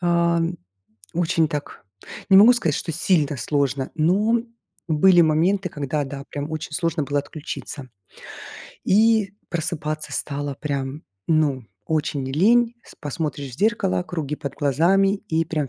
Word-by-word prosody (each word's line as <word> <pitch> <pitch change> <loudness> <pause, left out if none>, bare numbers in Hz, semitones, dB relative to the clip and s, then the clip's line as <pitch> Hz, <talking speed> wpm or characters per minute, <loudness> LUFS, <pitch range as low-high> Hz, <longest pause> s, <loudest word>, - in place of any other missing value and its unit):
ам, 170 -1 +1 0.6
очень 165 -1 +1
так, 145 -7 -6 0.5
не 190 - +8
могу 230 +5 +8
сказать, 165 -11 0
что 165 - -3
сильно 160 -4 +1
сложно, 140 -1 -1
но 205 +9 +2 0.5
были 175 +3 +5
моменты, 175 +5 +2
когда, 145 0 -2
да, 140 0 -7
прям 145 +1 -4
очень 155 -1 -5
сложно 165 -2 0
было 145 +1 0
отключиться, 145 -2 -7 1.0
и 215 -1 +3 0.2
просыпаться 155 -2 -3
стало 145 -1 -3
прям, 140 0 -4 0.2
ну, 150 -6 +1 0.2
очень 150 -3 -1
лень. 225 - +3
С - - -15
посмотришь 145 -2 -4
в - - -17
зеркало- 200 - +1
круги 150 -4 -4
под 140 -2 -6
глазами, 180 +8 +2 0.2
и 165 +1 +2
прям 150 -4 -2
155 Hz, 135 wpm, -23 LUFS, 145-180 Hz, 1.0 s, не